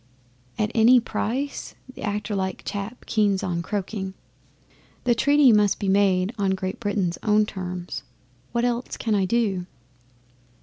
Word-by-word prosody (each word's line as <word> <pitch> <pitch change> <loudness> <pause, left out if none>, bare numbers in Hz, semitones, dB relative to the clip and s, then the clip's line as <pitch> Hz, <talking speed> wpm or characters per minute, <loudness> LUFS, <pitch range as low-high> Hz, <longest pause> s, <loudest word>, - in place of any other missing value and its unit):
'"At 210 -1 0
any 240 +3 +6
price?" 255 +4 -3 0.2
the - - -11
actor 210 +1 -2
like 190 -1 -2
chap 200 +4 -5
keeps 205 -3 +1
on 170 -2 -1
croaking. 190 0 -4 0.9
'"The 245 - +3
treaty 285 +2 +5
must 210 -2 +3
be 200 - -2
made 195 0 +3
on 190 -1 +2
Great 185 0 -4
Britain's 200 -5 -1
own 210 0 +3
terms. 180 -3 -5 0.5
What 235 +1 +1
else 245 0 -2
can 225 - -1
I 195 -2 +2
do?" 195 -4 0
205 Hz, 140 wpm, -24 LUFS, 190-230 Hz, 0.9 s, any